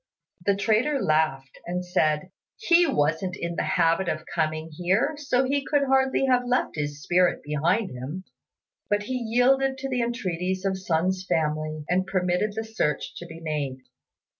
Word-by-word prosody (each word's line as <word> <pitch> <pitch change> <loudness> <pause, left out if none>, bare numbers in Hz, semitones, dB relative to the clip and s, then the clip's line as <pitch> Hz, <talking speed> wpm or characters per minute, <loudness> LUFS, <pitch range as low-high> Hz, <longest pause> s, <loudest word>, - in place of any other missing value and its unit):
The 200 - +2
trader 225 +8 +1
laughed 155 - 0
and 180 +1 -2
said, 155 0 +1 0.3
"He 350 -5 +4
wasn't 165 - 0
in 170 0 -3
the - - 0
habit 165 +2 +2
of 155 0 -3
coming 155 0 -1
here, 185 - +1
so 270 -3 +1
he 275 +2 0
could 290 0 +1
hardly 265 0 +2
have 250 -2 +3
left 250 +1 0
his 145 -1 -4
spirit 180 0 +2
behind 170 +8 0
him;" 135 +9 -6 0.7
but 205 0 +1
he 255 - -4
yielded 255 +3 +2
to 270 +1 -4
the 250 -2 0
entreaties 185 -5 -2
of 190 -1 0
Sun's 185 +1 0
family, 155 -2 -1
and 185 +2 +1
permitted 185 +2 0
the 220 - -2
search 220 -10 -2
to 175 - -8
be 165 0 -10
made. 150 -5 -3
185 Hz, 165 wpm, -25 LUFS, 155-245 Hz, 0.7 s, He